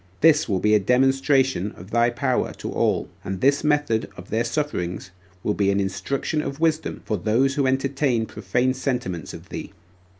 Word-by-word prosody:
This 155 -4 +5
will 95 - +2
be 105 +3 +3
a 105 - +6
demonstration 135 - +2
of 95 +4 -13
thy 120 +1 +3
power 130 +1 -1
to - - -6
all - - +1 0.2
and 95 0 -4
this 140 +2 +3
method 145 -7 +1
of 90 - -11
their 110 +2 +1
sufferings 115 - -3 0.3
will 105 - +1
be 100 -1 +1
an 100 0 +2
instruction 100 +10 -1
of 140 0 -5
wisdom 160 -1 0
for 105 - -1
those 120 +9 +1
that 140 -3 +2
entertain 135 -2 +1
profane 120 +6 0
sentiments 125 - -3
of - - -11
thee. - - -7
125 Hz, 175 wpm, -23 LUFS, 105-140 Hz, 0.3 s, a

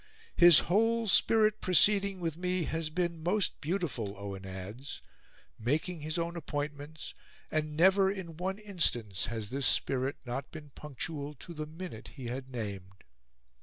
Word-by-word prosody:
"His 175 -3 +8
whole 225 +5 +2
spirit 215 +1 +4
proceeding 195 +2 +4
with 165 -3 -2
me 180 +1 -1
has 160 0 -2
been 170 0 -2
most 180 +5 +1
beautiful," 150 - -2
Owen 100 -1 -7
adds, 95 +9 -7 0.6
"making 150 +8 -1
his 155 +3 -3
own 170 0 -2
appointments; 145 -1 -5 0.4
and 155 -1 -1
never 190 +3 +5
in 190 -4 -5
one 190 +3 -2
instance 155 - 0
has 110 -2 -5
this 135 -1 +2
spirit 135 +1 +2
not 125 +3 -4
been 150 -2 -10
punctual 150 +1 -6
to 170 +6 -10
the 155 -1 -5
minute 160 -7 -8
he 135 -3 -8
had 130 +1 -5
named." 100 -5 -6
155 Hz, 145 wpm, -31 LUFS, 130-180 Hz, 0.6 s, His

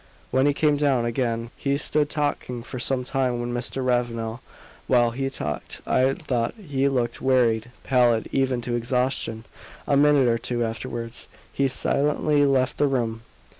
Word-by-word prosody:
When 130 +2 +3
he 145 - +3
came 150 -1 +2
down 135 -5 +2
again 115 -1 -1
he 140 0 -1
stood 150 0 0
talking 145 -5 -2
for 125 +1 -7
some 130 +1 0
time 125 -2 0
with 120 0 -3
Mr. 125 +2 -3
Ravenel. 120 -2 -1 0.5
While 120 -2 +4
he 135 +3 -2
talked 75 - -4
I 130 +1 +3
thought 120 -3 -2
he 140 -10 -1
looked 120 -3 -1
wearied 120 -3 +2
pallid 120 -4 +3
even 130 -2 +1
to 120 0 -3
exhaustion; 120 -2 -1 0.4
a 140 - +2
minute 145 -2 +5
or 115 -1 +2
two 120 0 -1
afterwards 115 +1 -5 0.3
he 140 - +2
silently 145 +2 +1
left 130 -2 +1
the 145 - +4
room. 115 -4 -1
125 Hz, 160 wpm, -24 LUFS, 120-135 Hz, 0.5 s, minute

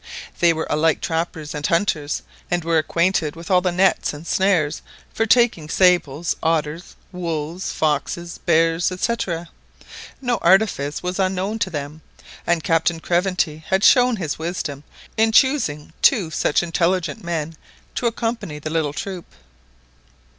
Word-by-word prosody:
They 170 -1 +5
were 160 -1 -2
alike 160 +1 +2
trappers 160 -2 -3
and 150 -1 -5
hunters, 165 -5 0 0.3
and 175 -1 0
were 165 0 +2
acquainted 170 -1 0
with 165 +2 -8
all 180 -1 +5
the 180 -1 0
nets 185 -1 +2
and 150 +3 -10
snares 170 -6 +1 0.3
for 225 - 0
taking 225 -10 +3
sables, 175 -4 +2
otters, 160 +1 -1 0.2
wolves, 170 -1 -4
foxes, 160 +3 -2
bears, 165 +1 +2
&c. 185 +5 0 1.1
No 245 -3 0
artifice 175 -6 +2
was 180 +2 -3
unknown 190 +3 -1
to 210 - 0
them, 150 -1 -6 0.5
and 170 -2 +1
Captain 165 0 +1
Craventy 175 -2 0
had 190 +1 +1
shown 250 -1 +6
his 160 -8 -4
wisdom 160 -4 -4 0.3
in 220 0 +3
choosing 220 - +2
two 195 -12 +3
such 150 - +1
intelligent 170 -2 0
men 165 -2 -3 0.4
to 240 - -1
accompany 225 -8 -3
the 155 +1 -6
little 160 -3 0
troop. 185 +1 -6
170 Hz, 140 wpm, -21 LUFS, 155-190 Hz, 1.1 s, shown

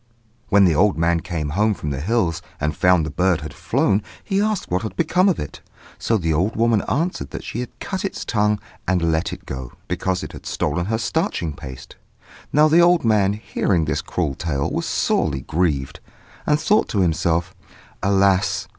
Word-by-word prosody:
When 100 -1 +6
the 85 - +4
old 95 +4 +3
man 85 +1 +2
came 80 -3 -4
home 105 +7 +1
from 75 - -4
the 70 0 -3
hills 90 -3 0 0.2
and 75 0 -1
found 90 -2 +3
that - - -3
the - - -22
bird 90 -2 +2
had - - -7
flown, 100 +2 +1 0.2
he 195 -1 0
asked 215 - -1
what 90 +2 +1
had 110 -4 -5
become 180 +4 +3
of 185 - 0
it; 75 - -7 0.4
so 115 - +1
the 80 -5 0
old 95 +8 0
woman 115 -2 +3
answered 170 +5 -1
that - - -7
she 120 - -5
had 125 - -7
cut 190 +1 -4
its 195 - -4
tongue 105 -1 +1 0.3
and 85 -2 +2
let 80 +2 0
it - - -9
go, 65 -2 -6
because 95 -1 -1
it - - -6
had - - -10
stolen 90 +1 -1
her 110 +1 0
starching 85 -7 -1
paste. 65 -3 -10 0.5
Now 150 +1 +5
the 165 +3 +5
old 170 -4 +4
man, 105 -3 +3
hearing 95 -5 0
this 75 - -1
cruel 80 -6 -2
tale, 70 -2 -2
was - - -2
sorely 65 -1 0
grieved, 75 -4 -1 0.5
and 150 0 +3
thought 200 +8 +2
to 100 - +1
himself, 85 +1 +1 0.5
"Alas! 100 0 +2
95 Hz, 195 wpm, -21 LUFS, 80-115 Hz, 0.5 s, When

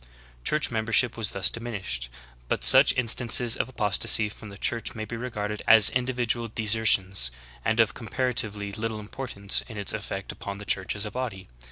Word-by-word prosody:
Church 150 - 0
membership 115 +1 +1
was 110 -3 -1
thus 95 - +1
diminished; 100 - -5 0.2
* - - -28
but - - -2
such - - +8
instances 120 -1 +2
of - - -3
apostasy 110 -2 +3
from 105 +1 -12
the 100 - -11
Church 115 +2 -2
may 110 -1 -5
be 115 - -7
regarded 105 -3 -5
as 110 -2 +8
individual 125 -2 -1
desertions 105 - +2 0.3
and 110 +1 0
of 115 -1 +3
comparatively 110 -3 -1
little 110 +1 -4
importance 105 -2 -4
in 110 - -9
its 100 - +1
effect 100 -2 -5
upon 100 0 -8
the 105 - -10
Church 95 -1 -1
as 100 +1 -1
a 105 - -5
body. 115 -7 -6
110 Hz, 175 wpm, -25 LUFS, 100-115 Hz, 0.3 s, such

